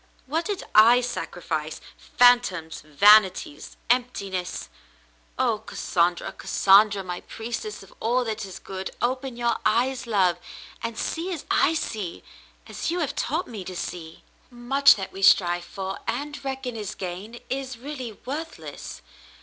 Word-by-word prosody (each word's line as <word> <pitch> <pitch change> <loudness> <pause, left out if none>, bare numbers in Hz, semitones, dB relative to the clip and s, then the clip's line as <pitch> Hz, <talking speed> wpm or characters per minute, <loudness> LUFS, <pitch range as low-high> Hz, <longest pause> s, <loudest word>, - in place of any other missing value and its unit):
What 320 +5 -1
did 410 -3 -3
I 230 +3 +8
sacrifice? 165 -10 -4 0.4
Phantoms, 240 -10 +4
vanities, 185 0 +4
and 245 +1 +4
emptiness. 190 -6 -5 0.7
Oh, - - +1
Cassandra, 175 +1 -1
Cassandra, 200 0 +4
my 180 -1 -5
priestess 240 - -6
of - - -17
all 245 +3 +1
that 220 -1 -3
is 190 -2 -8
good! 190 0 -6
Open 255 +1 -2
your 235 -1 +1
eyes, 245 +4 +1
love, 185 -6 +2 0.4
and 230 -1 -4
see 340 +3 -3
as 330 -5 -5
I 325 - +3
see 205 - -4 0.2
— - - -31
as - - -4
you 345 - -1
have 295 - -2
taught 320 +7 -1
me 215 -5 -7
to 185 0 -7
see. 165 -2 -6 0.2
" - - -33
Much 260 +3 +5
that 195 -2 -6
we 195 - -8
strive 175 -2 +4
for 190 +1 -5
and 285 +6 -3
reckon 265 -2 -4
as 210 -3 -5
gain 195 +6 -6
is 265 -2 -3
really 255 -2 -6
worthless. 310 +5 -7
225 Hz, 150 wpm, -25 LUFS, 190-260 Hz, 0.7 s, I